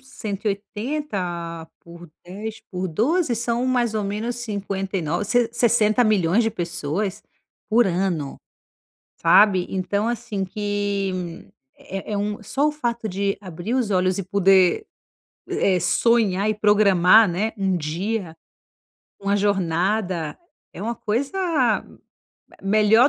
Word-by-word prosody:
180 200 - -4
por 170 -1 -13
10, 210 +5 -7
por 185 0 -3
12 255 - +1
são 235 +2 -1
mais 240 -3 +1
ou 215 - 0
menos 215 +4 -3
59 195 -5 -3
sesse 245 -1 +2
60.000.000 215 -4 +3
de 225 - +1
pessoas 170 +2 -3 0.5
por 230 +2 +4
ano, 175 -6 -1 0.8
sabe. 190 -4 +5
Então, 200 +4 -1
assim, 235 -4 -3
que 195 -3 -3 0.3
é 195 +3 -7
é - - 0
um 205 +1 -3
só 280 +8 +1
o - - -2
fato 235 -6 -3
de 195 0 -1
abrir 185 +6 -4
os 245 -5 0
olhos 185 -1 +2
e - - -1
poder, 195 - +3 0.6
eh, 190 -2 +2
sonhar 215 -4 +2
e - - +2
programar, 205 0 +5
né, 205 +6 -1
um 190 -2 +1
dia, 175 +2 -3 0.8
uma 200 +1 +1
jornada 185 -3 0 0.3
é - - -9
uma 230 +3 -2
coisa 240 - -2 0.5
m - - -18 0.7
melhor 215 +5 +5
200 Hz, 120 wpm, -23 LUFS, 185-225 Hz, 0.8 s, sabe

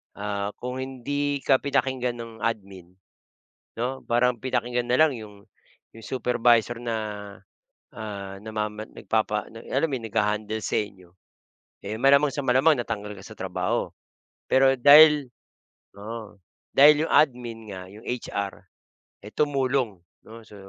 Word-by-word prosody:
ah, 100 0 -3
kung 125 +1 -4
hindi 140 +2 -2
ka 135 - +4
pinakinggan 130 -3 -1
ng 115 0 -8
admin, 95 -5 -5 0.9
'no? 130 +2 -3
Parang 120 +1 +2
pinakinggan 125 -1 -1
na 125 +5 +2
lang 155 -5 +4
'yong 105 -2 -12 0.5
'yong 115 - -12
supervisor 120 -2 +2
na, 120 -1 -3 1.0
ah, 100 -3 -6
namaman 110 0 -4
nagpapa 110 -1 -1
na 115 0 -12
alam 140 +5 +2
mo 135 - -2
yun 115 -3 -6
nagha-handle 105 +1 0
sa - - -3
inyo, 95 -4 -4 0.7
eh, 110 +3 -5
malamang 140 +1 +5
sa 145 - -3
malamang 135 +2 +3
natanggal 105 -3 -4
ka 95 - -11
sa - - -30
trabaho. 95 -1 -2 0.6
Pero 135 0 +5
dahil 150 0 +8 0.7
oo, 110 0 -8 0.4
dahil 150 +3 +7
'yong - - -3
admin 120 -6 +2
nga 95 -1 -7
'yong 105 +4 -14
HR, 100 -5 -3 0.7
eh, 105 - -10
tumulong, 135 -7 0 0.3
'no, 115 0 -13
so, 105 - -15
120 Hz, 135 wpm, -25 LUFS, 105-135 Hz, 1.0 s, dahil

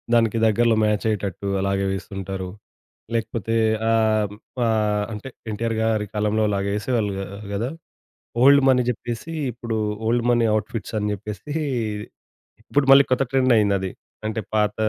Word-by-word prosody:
దానికి 115 -1 +3
దగ్గరలో 115 +1 +3
మ్యాచయ్యేటట్టు 105 -2 -1
అలాగే 100 0 0
వేస్తుంటారు. 95 0 -5 0.7
లేకపోతే 115 -1 -2 0.4
ఆహ్, 110 -2 +2 0.3
ఆహ్, 105 -2 +1
అంటే 105 +5 -6 0.2
ఎన్టీఆర్ 115 +2 -2
గారి 110 -2 +1
కాలంలో 105 +1 +1
అలాగే 100 0 -1
ఏసేవాళ్ళు 105 -3 -1 0.4
కదా! 115 +6 -1 0.7
'ఓల్డ్ 140 +1 +7
మనీ' 125 -1 +4
చెప్పేసి, 120 +6 -6 0.2
ఇప్పుడు 115 -2 -4 0.3
ఓల్డ్ 120 0 +2
మనీ 120 -1 +3
ఔట్‌ఫిట్స్ 110 0 -5
అని 105 0 -1
చెప్పేసి, 105 +6 -7 1.1
ఇప్పుడు 145 -1 0
మళ్ళీ 140 - +8
కొత్త 130 +1 +3
ట్రెండ్ 130 -2 +4
అయింది 100 -2 +3
అది. 95 -1 -3 0.4
అంటే, 110 +1 -2 0.2
పాత 105 -1 +2
110 Hz, 130 wpm, -23 LUFS, 105-115 Hz, 1.1 s, మళ్ళీ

